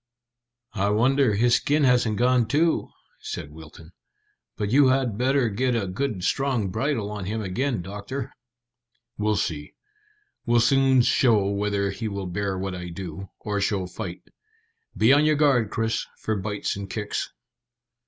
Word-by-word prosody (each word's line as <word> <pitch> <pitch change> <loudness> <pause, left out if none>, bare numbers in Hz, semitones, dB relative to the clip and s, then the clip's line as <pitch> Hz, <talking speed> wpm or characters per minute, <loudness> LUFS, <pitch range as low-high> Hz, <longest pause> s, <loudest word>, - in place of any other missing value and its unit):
"I 100 -1 0
wonder, 125 +2 +3
his 120 +3 +4
skin 150 +1 +1
hasn't 125 -5 +3
gone 125 -1 +3
too," 160 +3 +1 0.3
said 75 - -6
Wilton. 80 +1 -13 0.7
"But 105 -1 -2
you 140 +1 +6
had 130 -4 +1
better 130 +2 +2
get 125 +4 0
a 110 -4 0
good 95 0 -3
strong 125 -8 0
bridle 110 -1 -1
on 105 -3 -5
him 110 +3 -3
again, 115 +2 -2
doctor." 105 +8 -6 0.9
"We'll 105 0 +1
see. 75 -7 -3 0.7
He'll 120 0 +4
soon 135 +1 +4
show 115 -5 +3
whether 100 -1 -1
he 110 +3 -4
will 100 -2 -4
bear 95 +2 -2
what 95 0 -3
I 90 -1 -6
do, 95 +1 -7
or 105 -1 -2
show 95 -1 0
fight. 90 -1 -7 0.7
Be 115 +5 +5
on 145 +1 +5
your 155 0 +3
guard, 135 -7 +3
Chris, 115 +1 -1
for 110 - -2
bites 105 +1 -3
and 100 -1 -7
kicks." 105 0 -3
110 Hz, 155 wpm, -25 LUFS, 100-130 Hz, 0.9 s, you